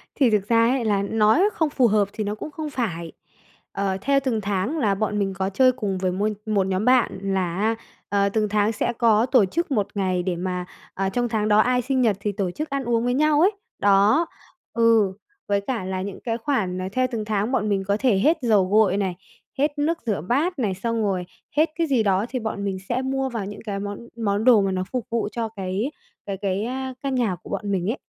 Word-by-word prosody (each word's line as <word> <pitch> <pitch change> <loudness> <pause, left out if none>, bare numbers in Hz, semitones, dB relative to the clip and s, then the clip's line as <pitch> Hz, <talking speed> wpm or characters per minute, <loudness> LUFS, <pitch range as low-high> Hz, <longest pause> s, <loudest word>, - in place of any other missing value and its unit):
Thì 265 -5 +4
thực 205 -2 +1
ra 230 0 +4
ấy, 255 -2 0
là 205 -2 +2
nói 215 - +3
không 320 -2 +1
phù 260 -4 +3
hợp 210 -1 +2
thì 215 - -3
nó 205 +1 -2
cũng 300 - -7
không 310 0 -5
phải, 175 - -3 0.6
ờ, 195 -1 -1
theo 275 +5 +3
từng 230 -5 0
tháng 205 - -1
là 210 -9 +2
bọn 210 0 -1
mình 195 -1 0
có 190 0 -2
chơi 255 +6 +4
cùng 210 -7 -3
với 185 0 0
môi 205 +3 0
một 200 -3 +1
nhóm 190 +3 -1
bạn 250 -6 +3
là 190 -3 -1
á, 220 +3 +1 0.3
ờ, 200 0 +2
từng 210 0 0
tháng 210 +1 +2
sẽ 230 - -1
có 225 -1 +3
tổ 250 -5 +4
chức 330 - -2
1 210 -7 +1
ngày 185 -3 0
để 180 -2 -1
mà, 180 0 -3 0.3
à, 195 0 -1
trong 240 +3 -1
tháng 215 -2 0
đó 210 0 +4
ai 250 +2 +3
sinh 260 +1 0
nhật 215 -5 +2
thì 205 +1 -2
tổ 195 -3 -2
chức 305 - -5
ăn 275 -1 -2
uống 235 -1 +1
với 245 0 +1
nhau 300 +2 +3
ấy. 380 +4 +5 0.3
Đó, 205 +11 +4 0.5
ừ, 225 -4 +4 0.3
với 200 0 +1
cả 225 -3 -3
là 185 0 -3
những 195 0 -6
cái 230 -1 -1
khoản, 220 -8 -1
ờ, 185 - -3
theo 255 +4 +1
từng 220 -2 -3
tháng 210 +2 -1
bọn 215 -5 0
mình 195 -1 0
có 200 - +2
thể 245 -7 +3
hết 315 - +3
dầu 215 -6 +3
gội 205 -1 +3
này, 190 -3 -1 0.4
hết 290 +2 0
nước 315 +3 +1
rửa 205 -9 -1
bát 280 - 0
này, 210 -6 0
xong 230 +4 -2
rồi 190 -3 -1 0.3
hết 315 +2 +4
cái 330 -1 0
gì 255 -5 +2
đó, 195 0 +2
thì 255 - -2
bọn 220 -3 -4
mình 195 -1 -2
sẽ 245 +2 0
mua 265 0 -1
vào 230 -5 -4
những 205 +1 -8
cái 200 -2 -3
món 205 0 -5 0.2
món 205 -1 0
đồ 235 -5 +6
mà 195 - 0
nó 185 0 -1
phục 250 -3 -2
vụ 230 -2 0
cho 230 -2 -3
cái 200 +5 -3 0.3
cái 195 -1 -4
cái, 195 0 -1
a, 260 +1 -4
căn 275 -1 -1
nhà 230 -8 +1
của - - -11
bọn 205 -1 -3
mình 190 0 0
ấy. 260 - -4
215 Hz, 245 wpm, -23 LUFS, 195-250 Hz, 0.6 s, đồ